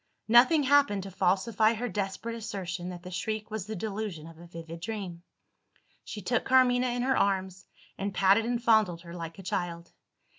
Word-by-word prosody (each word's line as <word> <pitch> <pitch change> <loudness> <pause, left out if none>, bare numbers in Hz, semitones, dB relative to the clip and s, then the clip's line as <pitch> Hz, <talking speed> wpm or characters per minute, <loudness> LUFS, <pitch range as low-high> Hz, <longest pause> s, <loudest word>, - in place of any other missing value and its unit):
Nothing 255 +7 +6
happened 275 -8 +3
to 195 - -8
falsify 195 +4 +2
her 245 +3 -3
desperate 200 +2 -3
assertion 185 -5 -5
that 175 -1 -8
the 180 - -8
shriek 215 +3 -4
was 215 -3 -4
the 220 - -4
delusion 200 -5 -4
of 165 0 -13
a 170 - -12
vivid 165 0 -9
dream. 190 -3 -5 0.8
She 210 - -8
took 245 +6 0
Carmina 255 -1 +4
in 245 0 -1
her 265 +1 +2
arms, 190 -1 -1 0.3
and 200 +1 -2
patted 195 +3 +3
and 240 0 -1
fondled 220 -7 +3
her 170 -1 -11
like 165 0 -7
a 195 - -10
child. 170 -1 -4
200 Hz, 180 wpm, -29 LUFS, 180-230 Hz, 0.8 s, Nothing